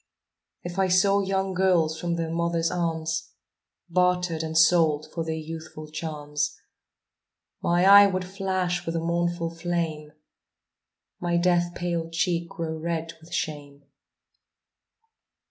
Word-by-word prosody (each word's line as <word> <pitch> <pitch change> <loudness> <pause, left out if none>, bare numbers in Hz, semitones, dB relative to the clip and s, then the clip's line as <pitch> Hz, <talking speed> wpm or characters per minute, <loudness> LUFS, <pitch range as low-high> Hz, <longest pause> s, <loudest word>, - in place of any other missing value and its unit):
If 175 +2 -5
I 190 - +3
saw 195 +2 +4
young 190 0 -1
girls 175 -4 +2
from 170 0 -1
their 165 -1 -2
mother's 170 0 0
arms 165 - -2 0.5
Bartered 180 -2 +1
and 160 0 -2
sold 160 -2 +4
for 165 - -2
their 160 0 -3
youthful 160 -1 -8
charms, 150 -1 -3 1.0
My 175 +1 +2
eye 200 +1 +9
would 185 -1 -2
flash 185 -2 -2
with 165 - -3
a - - +1
mournful 170 0 -1
flame, 165 -3 -3 1.1
My 175 -1 0
death 175 0 +2
paled 170 -2 -3
cheek 170 0 0
grow 160 -1 -4
red 165 0 -3
with 165 +1 -16
shame. 145 -4 -4
170 Hz, 125 wpm, -26 LUFS, 160-180 Hz, 1.1 s, eye